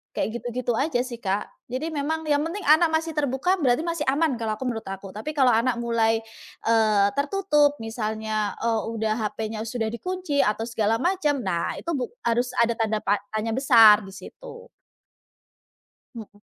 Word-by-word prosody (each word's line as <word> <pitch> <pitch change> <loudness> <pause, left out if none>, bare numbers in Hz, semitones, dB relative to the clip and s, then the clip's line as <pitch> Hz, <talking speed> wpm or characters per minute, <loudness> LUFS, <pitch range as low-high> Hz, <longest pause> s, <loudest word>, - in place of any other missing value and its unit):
Kayak 235 +2 -2
gitu-gitu 245 0 -2
aja 270 -2 +1
sih 240 -2 -7
Kak. 195 +1 -1 0.3
Jadi 270 +6 -2
memang 315 +2 -2
yang 295 -1 +2
penting 385 +5 -5
anak 315 +3 +5
masih 320 0 -1
terbuka 290 +4 0
berarti 255 +1 +2
masih 335 -2 -3
aman 300 +2 +1
kalau 215 -1 -2
aku 260 - -6
menurut 225 -2 -4
aku. 195 0 -7
Tapi 220 +9 -5
kalau 255 -2 +5
anak 235 +2 +1
mulai, 225 -1 +2 0.5
eee, 215 -3 +4
tertutup 295 -2 +2
misalnya, 220 -2 -3
eee, 225 -1 0
udah 220 -1 -1 0.2
HP-nya 220 0 -5
sudah 225 -1 -2
dikunci 360 +1 -2
atau 210 +2 0
segala 225 -1 0
macam, 325 -5 +1
nah 170 -1 -1
itu 335 - -4
buk 255 -3 -2 0.2
harus 240 +2 +1
ada 235 0 +3
tanda 220 -1 0
pa 205 +1 +1
tanya 220 +1 -1
besar 225 -6 +7
di - - -10
situ. 475 - -12 1.5
Mhm. 205 -2 -11
240 Hz, 165 wpm, -24 LUFS, 220-295 Hz, 1.5 s, besar